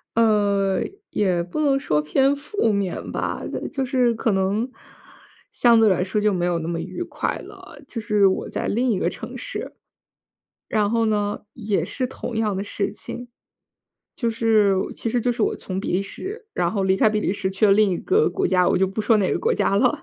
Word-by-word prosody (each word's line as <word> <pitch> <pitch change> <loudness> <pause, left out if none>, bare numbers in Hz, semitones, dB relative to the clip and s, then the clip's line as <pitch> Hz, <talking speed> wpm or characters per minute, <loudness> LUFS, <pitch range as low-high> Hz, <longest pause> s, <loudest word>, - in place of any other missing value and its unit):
呃， 205 -4 +2 0.3
也 185 -4 +1
不 175 - -5
能 275 -2 +3
说 150 - +1
偏 270 - +2
负 285 - -1
面 200 -3 -2
吧， - - -3 0.3
就 270 -3 -2
是 250 -2 +2
可 225 0 0
能， 195 +5 0 0.8
相 235 -2 +5
对 220 -2 +5
来 180 -1 +2
说 200 +3 -1
就 210 0 +3
没 175 -2 0
有 175 -1 0
那 160 - -5
么 170 -1 -2
愉 350 - -6
快 - - -3
了， - - -12
就 230 - -5
是 210 -2 +3
我 190 - -1
在 - - -3
另 245 +3 +1
一 195 - 0
个 - - +1
城 - - -8
市。 - - -6 1.0
然 210 -1 +1
后 230 -1 +2
呢， 205 -1 0
也 215 -3 -1
是 255 -2 -2
同 245 -2 -6
样 215 -3 0
的 195 - -2
事 205 0 -3
情。 245 0 -8 0.9
就 235 - 0
是 220 -3 +3 0.2
其 230 - -3
实 240 +1 0
就 245 - +1
是 235 - -2
我 - - +1
从 190 0 -5
比 - - -3
利 190 +2 +1
时， 425 - -7
然 175 -1 0
后 200 -3 0
离 190 0 +3
开 215 - +4
比 215 0 0
利 190 - 0
时 190 -2 -2
去 195 +3 0
了 200 - +6
另 210 0 +4
一 175 - 0
个 425 +4 +2
国 390 - 0
家， 180 -1 +3
我 - - +2
就 190 - +3
不 195 +3 -3
说 215 +1 +4
哪 190 - +1
个 - - 0
国 470 +1 +1
家 - - +1
了。 - - +2
210 Hz, 235 characters per minute, -23 LUFS, 190-235 Hz, 1.0 s, 了